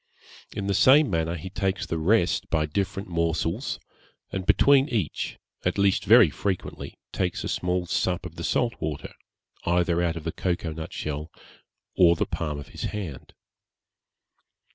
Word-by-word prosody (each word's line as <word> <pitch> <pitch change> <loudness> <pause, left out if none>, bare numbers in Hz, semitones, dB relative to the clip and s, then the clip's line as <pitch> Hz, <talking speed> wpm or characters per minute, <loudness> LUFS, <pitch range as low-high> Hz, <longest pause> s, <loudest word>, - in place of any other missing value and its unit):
In 100 - -3
the 100 - +1
same 135 +5 +6
manner 80 0 0
he 90 +3 -7
takes 95 0 -1
the 85 - -2
rest 90 +3 +2
by 80 -2 +1
different 95 +5 -2
morsels, 85 - -1 0.5
and 95 -1 -4
between 140 +1 +5
each, 105 - -2 0.3
at - - 0
least 100 0 +2
very 110 -5 +7
frequently, 95 +4 -4 0.2
takes 90 -2 -1
a - - -3
small 90 0 -1
sup 90 +1 -1
of - - -7
the - - -6
salt 120 -1 +1
water, 75 -2 -4 0.5
either 85 0 +2
out 85 -2 0
of 80 - -6
the 80 - -2
cocoa 85 -3 -2
nut 80 0 -7
shell, 75 +1 -4 0.7
or 85 -2 +6
the - - 0
palm 75 -3 -3
of 70 - -9
his - - -5
hand. 95 -10 -6
90 Hz, 160 wpm, -26 LUFS, 80-100 Hz, 0.7 s, very